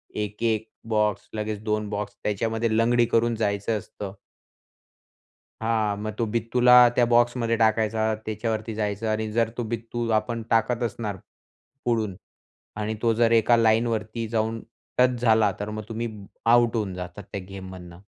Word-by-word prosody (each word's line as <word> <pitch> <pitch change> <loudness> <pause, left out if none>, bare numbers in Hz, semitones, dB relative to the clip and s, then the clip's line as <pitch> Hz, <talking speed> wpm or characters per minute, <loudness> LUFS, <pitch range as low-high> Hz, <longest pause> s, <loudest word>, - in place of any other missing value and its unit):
1-1 110 +1 -1 0.2
box, 105 -2 +1
लगेच 105 -1 -3
2 105 -1 -1
box 105 0 -4
त्याच्यामध्ये 110 +2 0
लंगडी 120 +1 +4
करून 115 0 +2
जायचं 105 0 0
असतं. 100 0 -8 1.5
हां, 110 -2 0
मग 110 +1 -4
तो 115 - +1
बित्तूला 120 +2 +3 0.2
त्या 120 - +4
बॉक्समध्ये 120 -1 +3
टाकायचा, 110 0 +2
त्याच्यावरती 110 +1 -3
जायचं 105 0 -2
आणि 110 0 -1
जर 115 0 +1
तो 120 - -1
बित्तू 115 +1 -3
आपण 115 +2 -5
टाकत 115 +2 +2
असणार 110 -3 -3 0.7
पुढून 110 -5 0 0.7
आणि 110 +1 -2
तो 115 -1 +3
जर 115 +1 +3
एका 115 +1 +5
लाईनवरती 115 0 +1
जाऊन 115 0 -1 0.4
टच 125 -1 +3
झाला, 110 -3 +4
तर 105 - -4
मग 110 0 -5
तुम्ही 115 +1 -3 0.4
आउट 120 -1 +5
होऊन 105 -5 -1
जातात 90 +2 -7
त्या 100 - -3
गेममधनं. 95 -2 -9
110 Hz, 140 wpm, -25 LUFS, 105-115 Hz, 1.5 s, एका